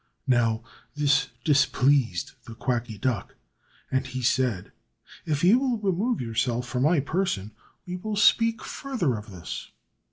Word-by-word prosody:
Now, 120 -3 +2 0.3
this 140 -2 +3 0.2
displeased 135 - +2
the 115 - -9
Quacky 120 -2 -2
Duck, 120 +2 -2 0.6
and 130 0 0
he 130 0 -5
said, 125 -6 +1 0.6
"If 150 -1 0
you 205 +8 +6
will 260 -3 0
remove 210 +4 0
yourself 120 +1 -1
from 125 0 -2
my 155 +4 +4
person, 140 - -1 0.3
we 180 0 -4
will 215 +3 -4
speak 230 +2 +4
further 230 - -2
of 105 +1 -8
this." 90 -3 -7
130 Hz, 135 wpm, -26 LUFS, 115-180 Hz, 0.6 s, you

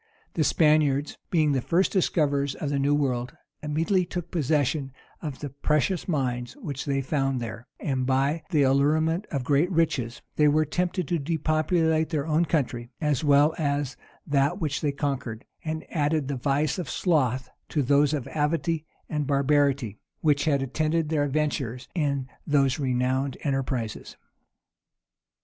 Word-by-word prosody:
The 160 - +1
Spaniards, 150 -2 +2
being 155 -4 +3
the 135 -2 +1
first 175 +8 +2
discoverers 145 -7 +1
of 145 - -3
the 140 - 0
new 140 +1 +3
world, 125 -4 -1 0.2
immediately 165 +5 +1
took 175 -1 -5
possession 145 -3 0 0.3
of 150 -5 -6
the 145 -2 -5
precious 150 +6 0
mines 125 -7 -1
which 145 - -5
they 135 -2 0
found 135 -1 0
there; 115 +1 -6
and, 130 -3 -1
by 135 +4 +1
the 155 -5 +3
allurement 155 +7 +2
of 140 -4 -3
great 145 +6 +2
riches, 140 -9 0
they 150 - +5
were 155 +2 +3
tempted 180 +2 -1
to 170 +1 0
depopulate 160 +1 +1
their 150 -3 -1
own 160 +2 +2
country, 125 -7 -1
as 150 -3 0
well 145 +1 +5
as 145 -2 -1 0.3
that 140 0 +1
which 150 -4 -1
they 145 - +1
conquered; 135 -5 -3 0.2
and 160 0 -4
added 150 -2 +1
the 140 - -1
vice 140 +5 0
of 170 - -4
sloth 130 -7 +1 0.2
to 150 - 0
those 145 +2 +4
of 140 -4 -2
avidity 160 +1 0 0.2
and 150 -3 -2
barbarity, 140 -5 +2 0.2
which 145 -2 +2
had 140 -3 +2
attended 155 +4 0
their 150 -2 +1
adventurers 135 -4 -2
in 140 -6 -1 0.2
those 140 -2 +2
renowned 130 0 0
enterprises. 130 -5 -2
145 Hz, 150 wpm, -26 LUFS, 135-155 Hz, 0.3 s, they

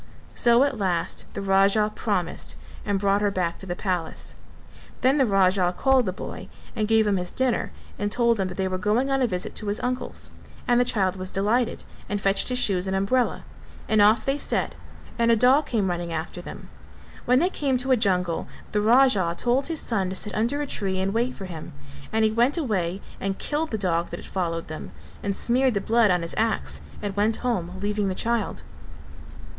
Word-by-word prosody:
So 235 +1 +4
at 280 -5 -1
last 180 -4 -1
the - - -3
Raja 195 +2 +3
promised - - -1 0.3
and 205 -1 0
brought 200 +1 +2
her 205 - +2
back 180 -3 -2
to 195 - -8
the 175 - -3
palace. 180 -5 -3 0.7
Then 265 +3 +3
the 265 - +4
Raja 190 -2 +3
called 265 -4 +3
the - - +1
boy 185 - -7 0.3
and 215 -2 0
gave 220 0 +4
him 205 -2 +2
his 180 0 -2
dinner 260 -3 0 0.3
and 205 0 -1
told 235 -1 +2
him 190 - +1
that 180 - -7
they 190 -1 0
were 185 0 -2
going 220 +7 +1
on 270 0 +2
a 250 - +3
visit 180 -4 -3
to 215 - -5
his 205 +2 -1
uncle's: 250 +1 -3 0.4
and 240 0 +4
the 245 - +3
child 190 -5 +1
was 185 0 -4
delighted 215 +6 0 0.3
and 205 - -1
fetched 195 +2 +1
his 250 - 0
shoes 195 -6 +2
and 190 - -1
umbrella, 235 +6 +1 0.4
and 215 -1 +3
off 215 +2 +5
they 275 +1 0
set, - - -1 0.5
and 235 0 +3
a 230 - +6
dog 260 +6 +4
came 215 -5 0
running 175 -1 -3
after 165 +2 -4
them. - - -10 0.6
When 250 +1 +4
they 355 +7 +2
came 275 -6 0
to 260 +2 -2
a - - +7
jungle 180 -7 0 0.2
the 210 - +1
Raja 215 -7 +4
told 255 +3 +1
his 325 -2 -2
son 195 -6 -1
to 190 - -4
sit 210 +2 -4
under 240 +7 0
a - - -2
tree 195 -8 -2
and 195 +1 -1
wait 240 +3 0
for 195 - -7
him, 165 -3 -8 0.4
and 220 0 +2
he 215 - +2
went 240 +8 +2
away 195 - -1 0.2
and 195 0 -2
killed 310 +2 -2
the 220 - -2
dog 175 -4 0
that - - -6
had - - -12
followed 165 -3 -2
them 155 - -7 0.3
and 200 -1 -2
smeared 250 +2 +2
the - - +2
blood 225 +2 +3
on 180 -2 +2
his 165 - -4
axe 70 0 -1 0.2
and 200 -1 -3
went 210 +2 +2
home, 185 -7 -1
leaving 205 0 0
the 190 - -2
child. 230 -1 -1
205 Hz, 210 wpm, -25 LUFS, 185-240 Hz, 0.7 s, a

